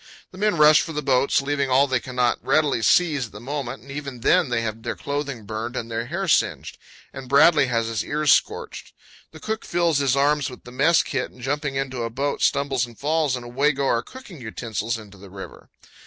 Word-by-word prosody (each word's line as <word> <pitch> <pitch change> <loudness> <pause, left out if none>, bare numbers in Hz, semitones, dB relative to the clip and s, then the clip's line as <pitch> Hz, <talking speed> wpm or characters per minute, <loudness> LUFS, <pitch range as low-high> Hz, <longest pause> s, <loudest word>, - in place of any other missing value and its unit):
The 185 - -13
men 210 -3 +1
rush 150 0 +7
for 165 - -5
the 150 0 -3
boats, 135 +1 +2
leaving 140 -1 -1
all 130 +2 +4
they 130 -3 0
cannot 125 -1 -1
readily 145 -6 +2
seize 145 - +3
at - - -22
the 105 - -9
moment, 130 -2 -5
and 135 - -12
even 140 -4 -6
then 175 +2 +3
they 120 -1 0
have 110 0 -4
their - - -4
clothing 140 -6 -4
burned 110 +4 -5
and 115 -1 -5
hair 135 +13 -3
singed, - - 0 0.3
and 130 -1 -9
Bradley 145 +1 +5
has 115 -2 0
his 115 -1 -2
ears 150 -1 +1
scorched. - - 0 0.4
The 155 - -13
cook 220 +4 -4
fills 170 -4 +1
his 135 -2 +2
arms 145 0 +2
with 125 - -12
the 125 - -12
mess 150 +7 +3
kit, 135 -2 -3
and 125 - -20
jumping 145 +2 -2
into 135 -2 -3
a 115 - -2
boat, 140 +5 -2
stumbles 140 -3 +1
and 115 -2 -15
falls, 150 -2 0
and 125 -1 -7
away 140 +5 +1
go 140 0 -2
our 115 -3 +2
cooking 215 - -12
utensils 110 0 -4
into 100 -3 -13
the 100 0 -13
river. 95 0 -11
135 Hz, 215 wpm, -23 LUFS, 120-150 Hz, 0.4 s, rush